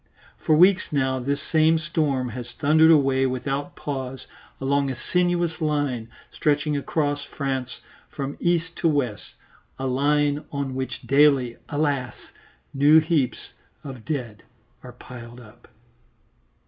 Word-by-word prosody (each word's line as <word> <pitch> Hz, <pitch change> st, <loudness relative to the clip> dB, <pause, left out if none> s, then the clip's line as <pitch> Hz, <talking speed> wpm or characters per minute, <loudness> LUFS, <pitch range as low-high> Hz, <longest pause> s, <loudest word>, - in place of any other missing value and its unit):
For 155 Hz, -, +2 dB
weeks 185 Hz, +3 st, +5 dB
now 130 Hz, -2 st, 0 dB
this 140 Hz, +3 st, -2 dB
same 160 Hz, 0 st, +3 dB
storm 150 Hz, -5 st, -1 dB
has 120 Hz, +1 st, -7 dB
thundered 160 Hz, +3 st, +4 dB
away 135 Hz, -4 st, +4 dB
without 135 Hz, +2 st, -3 dB
pause 135 Hz, -2 st, -5 dB, 0.3 s
along 140 Hz, +1 st, +1 dB
a 130 Hz, -, -3 dB
sinuous 175 Hz, +3 st, 0 dB
line 145 Hz, -7 st, -1 dB, 0.2 s
stretching 150 Hz, 0 st, 0 dB
across 145 Hz, 0 st, -1 dB
France 135 Hz, -3 st, -4 dB, 0.3 s
from 140 Hz, 0 st, -5 dB
east 170 Hz, -1 st, 0 dB
to -, -, +1 dB
west, 130 Hz, -, -2 dB, 0.4 s
a 135 Hz, -, -4 dB
line 145 Hz, +3 st, +1 dB
on 140 Hz, -2 st, -3 dB
which 130 Hz, 0 st, -5 dB
daily, 135 Hz, -4 st, +3 dB
alas! 145 Hz, -4 st, -1 dB, 0.6 s
new 145 Hz, +3 st, +6 dB
heaps 155 Hz, -5 st, -1 dB, 0.3 s
of 130 Hz, -5 st, -8 dB
dead 120 Hz, -8 st, -4 dB, 0.4 s
are 125 Hz, -1 st, -11 dB
piled 120 Hz, -1 st, -11 dB
up. 120 Hz, -1 st, -17 dB
140 Hz, 125 wpm, -24 LUFS, 130-155 Hz, 0.6 s, new